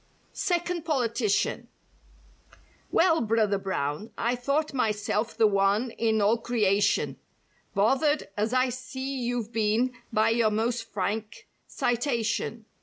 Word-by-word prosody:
II2 - - -37
(SECOND 350 -1 -1
POLITICIAN) 240 -8 0 1.2
"Well, 330 -2 +3
Brother 215 -3 +1
Brown, 190 +1 -3
I 235 +2 0
thought 280 +5 -1
myself 215 -2 -1
the 225 - +5
one 205 +4 +2
in 220 -1 +1
all 220 +3 +3
creation 205 -4 +1 0.6
"Bothered, 270 +9 +2
as 215 +2 0
I 255 0 +2
see 260 +2 -5
you've 240 -2 -2
been 225 +3 +1 0.2
by 220 0 +3
your 230 -1 +3
most 225 +2 -1
frank 210 +2 -3 0.2
citation. 235 -2 -1
230 Hz, 115 wpm, -27 LUFS, 210-255 Hz, 1.2 s, the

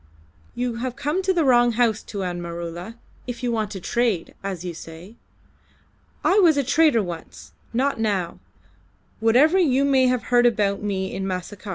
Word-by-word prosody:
"You 245 -1 -2
have 250 +1 -4
come 300 +7 -1
to 380 0 +1
the 345 -3 +2
wrong 240 -3 +4
house, 225 -2 +1
Tuan 180 -4 -5
Maroola, 170 +4 -6 0.3
if 245 0 -6
you 245 - 0
want 220 -2 -1
to 200 - -6
trade 225 -3 -1
as 185 -3 -5
you 175 - -4
say. 165 +5 -11 1.1
I 390 +3 +4
was 330 -6 +5
a 280 - +2
trader 285 -4 +3
once, 85 - -9 0.2
not 265 +2 0
now, 200 -6 -1 0.8
whatever 265 +11 +4
you 275 -5 +3
may 265 -2 +4
have 250 -1 0
heard 240 0 +6
about 205 -4 0
me 190 -2 -3
in 190 0 -3
Macassar. 190 +3 -6
225 Hz, 170 wpm, -23 LUFS, 190-255 Hz, 1.1 s, heard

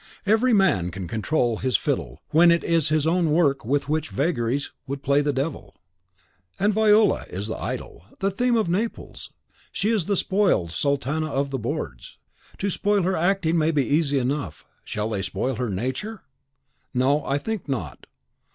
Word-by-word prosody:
Every 220 +5 +3
man 190 - +3
can 90 0 -6
control 115 - 0
his 130 +1 +1
fiddle - - -3
when 170 +3 +6
it 170 0 +3
is 165 -4 +2
his 155 -1 +1
own 170 0 +2
work 145 -4 +2
with 140 +5 0
which 155 +1 -1
its - - -13
vagaries 140 -3 0 0.2
would 140 +1 -5
play 140 +1 +3
the 145 0 +1
devil. 140 +3 -4 0.8
And 205 +2 +2
Viola 215 0 +4
is 95 +3 -4
the 110 - -4
idol, 85 - -6
the 195 +1 0
theme 245 +5 +1
of 220 - +1
Naples. 205 +7 -3 0.4
She 210 +3 0
is 210 -8 +1
the 200 - +1
spoiled 185 - +1
sultana 140 - -1
of 140 0 -1
the 135 - -2
boards. 115 - -5 0.4
To 200 0 -1
spoil 205 +1 +1
her 185 +2 +1
acting 170 -1 +1
may 155 0 +2
be 145 -5 +1
easy 145 -1 +2
enough, 130 - -2 0.2
shall 105 +1 -3
they 100 -3 -1
spoil 110 +6 -2
her 125 -2 -2
nature? 130 - -4 0.7
No, 140 +4 +2
I 140 - 0
think 205 +1 -4
not. 95 - -4
145 Hz, 175 wpm, -24 LUFS, 125-185 Hz, 0.8 s, when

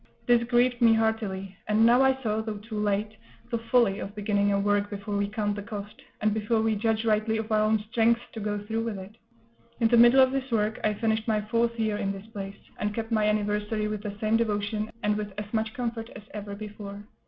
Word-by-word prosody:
This 240 -1 +5
grieved 245 +1 +2
me 230 -1 +6
heartily; 210 -4 -1
and 215 +2 +4
now 240 +3 +6
I 265 0 +3
saw, 215 -1 0
though 220 -1 -4
too 215 +1 -6
late, 210 +1 0 0.4
the 235 - 0
folly 230 -3 +2
of 200 - -6
beginning 205 -1 +1
a 200 - +2
work 205 0 +1
before 205 0 -4
we 200 0 +1
count 205 -1 -1
the 205 - -5
cost, 205 0 -8 0.2
and 215 0 +2
before 220 +1 0
we 220 0 +2
judge 220 +1 0
rightly 220 0 +2
of 220 0 -4
our 215 - +4
own 215 +1 +3
strength 230 0 +3
to 225 - -6
go 210 0 -2
through 220 +2 -3
with 225 -3 -3
it. 190 +3 -10 0.6
In 230 -2 +3
the 240 - +5
middle 240 +3 +7
of 260 0 +6
this 270 0 -2
work 215 -1 0
I 210 0 +1
finished 220 +1 0
my 215 -1 +2
fourth 230 +2 0
year 215 -2 0
in 195 -1 -1
this 195 +1 -8
place, 195 -1 -6 0.2
and 210 0 -2
kept 225 0 -4
my 215 -2 +2
anniversary 210 0 0
with 210 -1 -3
the 205 -1 -6
same 220 +1 +2
devotion, 210 -1 -1
and 210 0 +2
with 210 -1 -4
as 210 +1 -6
much 220 0 0
comfort 230 -2 -3
as - - -9
ever 205 -1 -6
before. 205 -1 -8
215 Hz, 230 wpm, -27 LUFS, 205-225 Hz, 0.6 s, middle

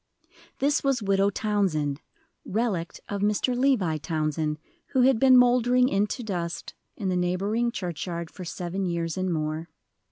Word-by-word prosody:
This 290 +2 +1
was 270 -5 +1
Widow 195 0 +3
Townsend, 185 -9 0 0.4
"relict" 195 -6 -2
of 200 -1 -3
Mr. 210 +4 +1
Levi 245 - +2
Townsend, 155 -1 -1 0.4
who 260 -2 +4
had 260 -3 +4
been 260 0 +7
mouldering 250 0 +4
into 205 +5 0
dust 175 -5 -4 0.2
in 200 -4 -2
the 185 - 0
neighboring 195 +7 0
churchyard 170 -3 -4
for 185 - -9
seven 180 +2 -4
years 170 -1 -2
and 185 -1 -1
more. 155 +1 -2
195 Hz, 140 wpm, -26 LUFS, 170-240 Hz, 0.4 s, been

